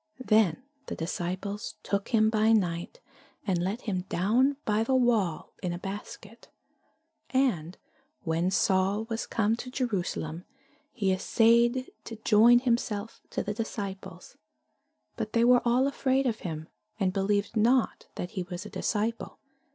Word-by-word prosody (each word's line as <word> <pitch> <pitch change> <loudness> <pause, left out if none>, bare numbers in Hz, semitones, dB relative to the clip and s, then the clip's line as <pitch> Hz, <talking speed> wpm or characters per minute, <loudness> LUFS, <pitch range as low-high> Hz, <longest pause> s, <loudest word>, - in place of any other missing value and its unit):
Then 215 -4 +3 0.2
the - - -4
disciples 185 +5 -4
took 200 0 -1
him 220 -2 +3
by 220 0 +3
night, 180 - -1 0.4
and 180 -3 0
let 195 +7 -2
him 185 -4 -3
down 250 +10 +2
by 215 +1 +2
the 260 +3 +1
wall 225 -10 +1
in 180 -2 -2
a - - -4
basket. 200 +3 -8 0.8
And 190 - 0 0.5
when 165 +1 0
Saul 190 +2 +2
was 225 - -2
come 220 0 +1
to 250 - -7
Jerusalem, 185 - -3 0.5
he 200 -8 0
assayed 235 +6 +3
to 230 - -7
join 225 +2 +6
himself 230 -4 -1
to - - -2
the 210 - -3
disciples: 195 -5 -6 0.8
but 215 -1 -4
they 230 - +3
were 245 0 +6
all 245 +2 +3
afraid 270 -1 +1
of 230 -3 0
him, 160 -2 -5 0.3
and 185 -2 +1
believed 200 +2 0
not 235 +3 +2
that 180 - -5
he 185 - -3
was 175 0 -6
a - - -9
disciple. 225 +2 -2
210 Hz, 145 wpm, -28 LUFS, 185-235 Hz, 0.8 s, join